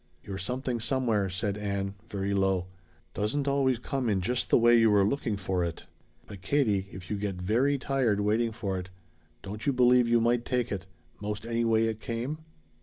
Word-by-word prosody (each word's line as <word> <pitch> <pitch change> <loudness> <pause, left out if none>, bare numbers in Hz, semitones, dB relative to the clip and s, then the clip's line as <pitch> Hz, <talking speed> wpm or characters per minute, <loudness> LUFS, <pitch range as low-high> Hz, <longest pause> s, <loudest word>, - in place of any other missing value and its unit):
"Your 95 -1 -6
Something 125 +4 -2
Somewhere," 115 -5 0
said 100 +2 -2
Ann, 100 -1 -2 0.2
very 100 0 -2
low, 95 -2 +1 0.5
"doesn't 135 +8 -1
always 135 -2 +2
come 125 +1 -2
in 100 -3 +2
just 125 +7 -1
the - - +6
way 120 0 +6
you 115 -1 +5
were 100 -1 +5
looking 110 -1 0
for 95 -2 -1
it. 85 -2 -4 0.4
But, 100 -3 -10
Katie, 100 -4 +1
if 90 0 -9
you 105 - 0
get 100 -1 -3
very 115 +10 +1
tired 130 -6 +1
waiting 110 +3 +1
for 100 -4 -3
it 90 0 -8 0.5
don't 105 +7 -6
you - - +5
believe 125 -1 +4
you 120 0 +4
might 120 +1 +2
take 125 -1 -1
it 95 -2 -4 0.3
most 105 +1 -4
any 115 0 0
way 115 -1 +3
it 110 -1 -2
came?" 125 +6 -3
110 Hz, 190 wpm, -28 LUFS, 100-125 Hz, 0.5 s, the